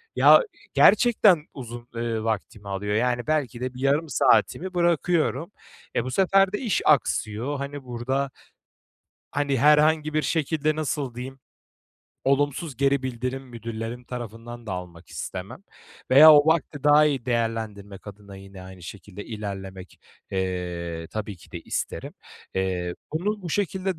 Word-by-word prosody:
ya - - +7 0.3
gerçekten 210 -8 +5
uzun, 120 -2 -8
eee, 115 -1 -2
vaktimi 105 -1 -3
alıyor. 100 +1 -2
Yani, 120 +2 0
belki 140 -6 -1
de 130 0 -3
bir 125 - -9
yarım 145 +4 +1
saatimi 185 +5 +2
bırakıyorum. 170 -2 +1 0.4
Eee, - - +1
bu 130 - -5
sefer 195 +5 +3
de - - 0
iş 230 -6 0
aksıyor. 130 -2 +1
Hani, 140 0 -6
burada 130 +3 -2 1.0
hani, 140 -1 0
herhangi 150 +2 +4
bir 155 - +2
şekilde 155 -1 0
nasıl 145 -5 -3
diyeyim, 130 +2 -7 0.9
olumsuz 145 +2 0
geri 140 +1 +2
bildirim 130 +1 -3
müdürlerim 115 -1 -7
tarafından 120 0 -8
da 100 - -4
almak 90 -2 -8
istemem. 95 - -7 0.5
Veya 150 +4 +10
o 145 0 +6
vakti 155 -3 0
daha 150 +1 +6
iyi 135 -5 -1
değerlendirmek 110 -5 -3
adına 100 -1 -11
yine 95 -1 -12
aynı 95 -1 -12
şekilde 100 +3 -9
ilerlemek, 95 -4 -7 0.3
eee, 90 -3 -3
tabii 105 -2 -5
ki 85 - -19
de - - -6
isterim. - - -4 0.4
Eee, 90 -2 -1 0.2
bunu 200 +6 -2
bu 175 - -5
şekilde 190 -1 -1
125 Hz, 140 wpm, -25 LUFS, 105-150 Hz, 1.0 s, Veya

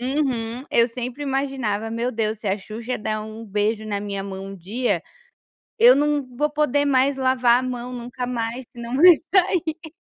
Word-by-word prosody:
Uhum. 250 -2 -1
Eu 235 +1 +4
sempre 250 +3 -5
imaginava: 265 -6 -1
"Meu 230 +2 -2
Deus, 220 -1 -2
se 210 - -3
a 195 - 0
Xuxa 225 +5 -5
der 215 0 -2
um 220 +1 -8
beijo 210 +2 -1
na 205 -1 -2
minha 200 -1 -4
mão 195 0 -6
um 195 0 -8
dia, 220 +8 -1 0.8
eu 480 +2 +8
não 295 -1 +1
vou 300 +2 +1
poder 290 -1 +1
mais 270 0 +2
lavar 255 -2 +3
a - - -4
mão 250 -1 -4
nunca 245 +1 -5
mais 240 +1 -3
senão 240 +1 -6
vai 350 +4 +9 0.2
sair". 340 -4 +1
245 Hz, 180 wpm, -23 LUFS, 220-275 Hz, 0.8 s, vai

